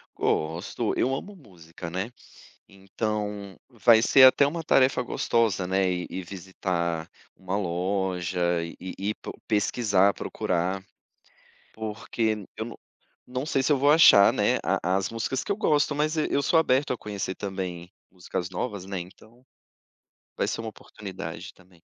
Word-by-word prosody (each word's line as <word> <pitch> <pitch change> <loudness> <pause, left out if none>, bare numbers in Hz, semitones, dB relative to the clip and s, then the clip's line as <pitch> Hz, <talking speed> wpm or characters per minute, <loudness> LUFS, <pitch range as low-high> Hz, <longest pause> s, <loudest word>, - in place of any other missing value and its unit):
Gosto, 85 +8 -1
eu 130 - +1
amo 200 +9 -7
música, 85 - -11
né. 95 +7 -3 0.6
Então, 100 0 -4
vai 115 -2 +5
ser 130 +3 +6
até 130 +2 +7
uma 165 +3 -4
tarefa 130 -4 +3
gostosa, 115 -6 0
né, 95 0 +2
ir 90 -1 -3
ir 95 - -5
visitar 85 -2 -3 0.3
uma 95 0 -4
loja 90 -2 -1
e 85 - -7
ir 95 0 -7
ir - - 0
pro - - -8
pesquisar, 105 -2 +2
procurar. 90 +2 -2 0.9
Porque 110 +1 -2
n 100 -3 -9
eu - - -3
não - - -9 0.5
não 130 +2 -2
sei 135 -3 0
se 135 - 0
eu 145 - +5
vou 140 +2 +4
achar, 150 -11 +8
né, - - +2
a 90 +3 +1
as 95 0 -1
músicas 115 +3 -2
que - - 0
eu - - -3
gosto, 150 -7 +2
mas 155 +2 0
e 155 - +1
eu 140 - +1
sou 165 - +3
aberto 140 -3 +2
a - - -2
conhecer 100 -3 -4
também 90 -3 -5 0.2
músicas 90 0 -5
novas, 95 0 -4
né, 95 -1 -4
então 110 +7 -14 0.9
vai - - 0
ser 115 - -2
uma 115 - -5
oportunidade 100 -3 -8
também. 90 -2 -23
100 Hz, 160 wpm, -26 LUFS, 90-125 Hz, 0.9 s, achar